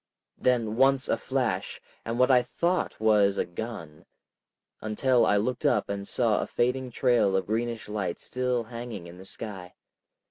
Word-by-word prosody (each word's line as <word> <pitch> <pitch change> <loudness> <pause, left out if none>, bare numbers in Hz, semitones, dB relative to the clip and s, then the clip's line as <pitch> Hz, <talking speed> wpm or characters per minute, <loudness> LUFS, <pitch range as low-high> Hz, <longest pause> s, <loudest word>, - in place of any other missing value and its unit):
Then 115 -3 +1
once 135 0 +4
a - - +3
flash - - -2 0.2
and 115 +1 -3
what 125 +1 +4
I 125 -1 +6
thought 170 +9 -1
was 105 -2 +3
a - - +1
gun, 85 -5 -8 0.7
until 120 +3 +2
I 105 - +4
looked 120 +4 -1
up - - +2
and 100 0 -4
saw 115 -4 +1
a - - -3
fading 125 +1 0
trail 120 -6 +2
of 95 - -1
greenish 115 +2 -2
light 100 -4 -3
still 125 -1 -1
hanging 115 -5 -7
in 85 +1 -11
the 95 - -11
sky. 95 -4 -7
115 Hz, 165 wpm, -27 LUFS, 100-125 Hz, 0.7 s, I